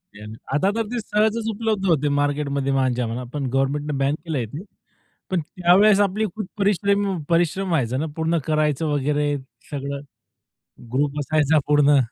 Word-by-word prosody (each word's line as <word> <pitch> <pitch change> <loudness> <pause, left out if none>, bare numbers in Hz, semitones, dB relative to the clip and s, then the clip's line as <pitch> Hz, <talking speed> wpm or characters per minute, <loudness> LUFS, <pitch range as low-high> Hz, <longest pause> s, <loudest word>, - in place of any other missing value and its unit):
Ban, 105 +1 -9 0.2
आता 185 +8 +2
तर 225 - +1
ते 245 - -1
सहजच 220 +1 0
उपलब्ध 215 -2 -1
होते 150 -4 +2
मार्केटमध्ये 140 -1 0
मांजा 130 -2 +1
म्हणा, 120 +3 -4
पण 145 -2 -2
गव्हर्नमेंटने 140 +2 0
बॅन 135 +2 +1
केलंय 145 -8 -2
ते. 145 - -8 0.7
पण 185 - +2
त्यावेळेस 185 +6 +4
आपले 205 +2 +1
खूप 215 -4 -4
परिश्रम 200 -1 +1
परिश्रम 175 +3 +1
व्हायचे 130 -7 0
ना, 150 - -1
पूर्ण 160 +1 0
करायचं 155 -1 +1
वगैरे 145 +1 0 0.4
सगळं. 140 -1 -4 0.9
ग्रुप 145 +2 0
असायचा 155 +1 +2
पूर्ण. 145 -1 +5
150 Hz, 150 wpm, -22 LUFS, 140-190 Hz, 0.9 s, पूर्ण